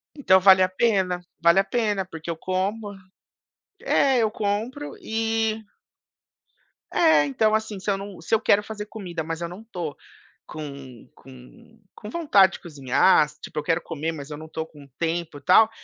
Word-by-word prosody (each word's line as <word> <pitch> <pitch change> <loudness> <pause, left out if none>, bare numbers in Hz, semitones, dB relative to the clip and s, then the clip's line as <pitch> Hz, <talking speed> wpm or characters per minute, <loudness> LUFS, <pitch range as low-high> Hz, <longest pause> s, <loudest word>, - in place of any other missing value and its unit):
Então 190 -11 +4
vale 190 0 +7
a 185 - +3
pena, 185 -3 +1 0.2
vale 170 +3 +5
a - - +4
pena, 210 -3 -1
porque 165 -2 -9
eu 165 - -3
como. 200 +4 -2 0.9
É, 270 -2 +2
eu 220 -2 +2
compro 220 +7 -3
e 225 0 -1 1.3
É, 320 - +5
então, 215 +10 +2
assim, 220 -2 -3
se 190 - -4
eu 195 - +1
não 195 -1 -9
se 170 +7 +1
eu - - +1
quero 210 -1 +4
fazer 210 0 -7
comida, 180 -7 -6
mas 165 0 -5
eu 170 - -2
não 180 +5 -10
tô 175 -9 -6 0.5
com 140 -6 -9
com 135 - -16 0.2
com 210 - -9
vontade 205 - +4
de - - -8
cozinhar 150 +1 +3
tipo, - - -10
eu - - -4
quero 165 +2 +1
comer, 165 0 -4
mas 145 -3 -8
eu 150 - -6
não 155 0 -10
tô 160 0 -4
com 150 -3 -15
tempo 165 -2 -2
e - - -13
tal, 200 +9 +6
190 Hz, 180 wpm, -24 LUFS, 160-220 Hz, 1.3 s, vale